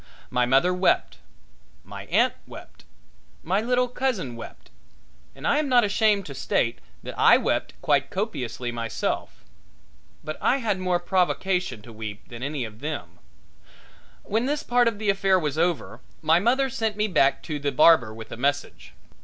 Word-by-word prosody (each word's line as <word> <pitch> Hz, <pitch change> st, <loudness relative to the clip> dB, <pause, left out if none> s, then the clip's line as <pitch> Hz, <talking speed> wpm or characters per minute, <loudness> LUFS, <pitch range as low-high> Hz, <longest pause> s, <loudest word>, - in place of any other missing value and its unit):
My 125 Hz, -1 st, +1 dB
mother 135 Hz, +8 st, +3 dB
wept, 180 Hz, +1 st, +1 dB, 0.6 s
my -, -, -9 dB
aunt -, -, +3 dB
wept, -, -, -13 dB, 0.6 s
my 190 Hz, +5 st, +1 dB
little 250 Hz, +2 st, +1 dB
cousin 240 Hz, -, -2 dB
wept, 115 Hz, -, -11 dB, 0.6 s
and -, -, -9 dB
I 290 Hz, -, +3 dB
am 300 Hz, -2 st, -1 dB
not 245 Hz, -2 st, +5 dB
ashamed 210 Hz, -1 st, +2 dB
to 140 Hz, -, -7 dB
state 120 Hz, -2 st, -1 dB, 0.2 s
that -, -, -6 dB
I -, -, +7 dB
wept -, -, -1 dB
quite 140 Hz, -2 st, +2 dB
copiously 125 Hz, -, -3 dB
myself. 115 Hz, -1 st, -4 dB, 0.8 s
But 155 Hz, 0 st, -6 dB
I 265 Hz, -, +3 dB
had 220 Hz, -7 st, -1 dB
more 180 Hz, -1 st, +1 dB
provocation 180 Hz, -, 0 dB
to 115 Hz, -, -12 dB
weep 110 Hz, 0 st, -8 dB
than 120 Hz, -1 st, -9 dB
any 140 Hz, 0 st, -3 dB
of 110 Hz, -1 st, -11 dB
them. 115 Hz, -, -6 dB, 1.0 s
When 225 Hz, +5 st, -1 dB
this 295 Hz, +1 st, -1 dB
part 245 Hz, 0 st, +3 dB
of 230 Hz, -3 st, 0 dB
the 210 Hz, -1 st, +1 dB
affair 195 Hz, -1 st, +2 dB
was 155 Hz, -3 st, -2 dB
over 170 Hz, -1 st, -1 dB, 0.2 s
my 165 Hz, +2 st, +4 dB
mother 255 Hz, +7 st, +2 dB
sent 220 Hz, -4 st, -2 dB
me 210 Hz, -, +1 dB
back 155 Hz, -8 st, +2 dB
to 150 Hz, -3 st, -4 dB
the 145 Hz, 0 st, -1 dB
barber 130 Hz, -4 st, +5 dB
with 110 Hz, 0 st, -10 dB
a -, -, -6 dB
message. 140 Hz, +3 st, -2 dB
175 Hz, 165 wpm, -25 LUFS, -, 1.0 s, I